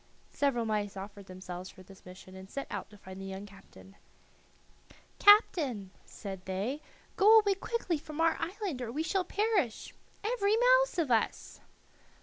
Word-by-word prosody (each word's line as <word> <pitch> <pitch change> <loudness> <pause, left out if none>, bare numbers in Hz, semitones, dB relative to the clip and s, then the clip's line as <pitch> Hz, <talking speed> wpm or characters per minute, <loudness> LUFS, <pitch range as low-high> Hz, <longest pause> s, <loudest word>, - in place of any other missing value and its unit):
Several 265 -5 0
mice 205 -2 -2
offered 200 0 -9
themselves 185 0 -8
for 185 - -14
this 190 0 -16
mission 185 +1 -12
and 190 0 -11
set 275 - -5
out 200 - -5
to 210 - -15
find 190 -1 -10
the - - -7
young 195 +1 -6
captain. 195 -1 -16 1.3
"Captain," 295 - +5
said 195 -3 -8
they, 205 +10 -3 0.4
"go 430 +2 +7
away 415 -2 +4
quickly 390 -5 -2
from 305 0 -9
our 330 0 +3
island, 365 - -4
or 235 -2 -4
we 300 +6 -2
shall 380 +3 0
perish, 395 - -1 0.3
every 430 -1 +1
mouse - - +4
of 315 -7 0
us." 225 -2 0
245 Hz, 155 wpm, -31 LUFS, -, 1.3 s, go